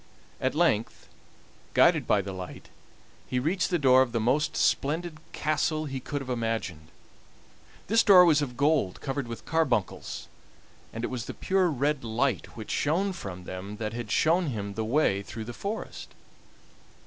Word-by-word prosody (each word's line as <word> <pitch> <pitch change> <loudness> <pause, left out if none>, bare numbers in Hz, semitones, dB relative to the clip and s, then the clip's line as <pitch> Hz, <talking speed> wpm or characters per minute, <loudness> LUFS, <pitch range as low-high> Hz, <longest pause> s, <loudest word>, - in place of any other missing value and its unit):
At 130 +2 0
length, 155 -10 +1 0.7
guided - - +5
by 100 - +3
the 95 0 -6
light, 90 -1 -8 0.6
he 125 - -2
reached 170 +8 0
the 175 - +2
door 130 -3 +6
of 125 -3 0
the 115 - +1
most 130 +7 +1
splendid 155 +2 0
castle 155 +1 0
he 135 -2 -4
could 145 +3 -4
have 135 - -8
imagined. 115 -9 -3 1.0
This 225 +2 +4
door 185 -4 +8
was 155 -3 +4
of 125 -4 -4
gold 140 - +2
covered 135 -2 -3
with 115 -1 -8
carbuncles, 135 -11 -1 0.6
and 115 - -6
it - - -2
was 125 -2 -4
the - - -7
pure 190 -1 +1
red 145 -1 0
light 115 -1 -1
which 110 - -6
shone 185 +7 +1
from 90 - -7
them 95 +3 -7
that 110 0 -4
had 120 -2 -5
shown 170 - +3
him 100 -6 -4
the 110 - -2
way 110 -4 +2
through 110 +2 -7
the 120 - -7
forest. 205 - -6
130 Hz, 165 wpm, -28 LUFS, 110-155 Hz, 1.0 s, door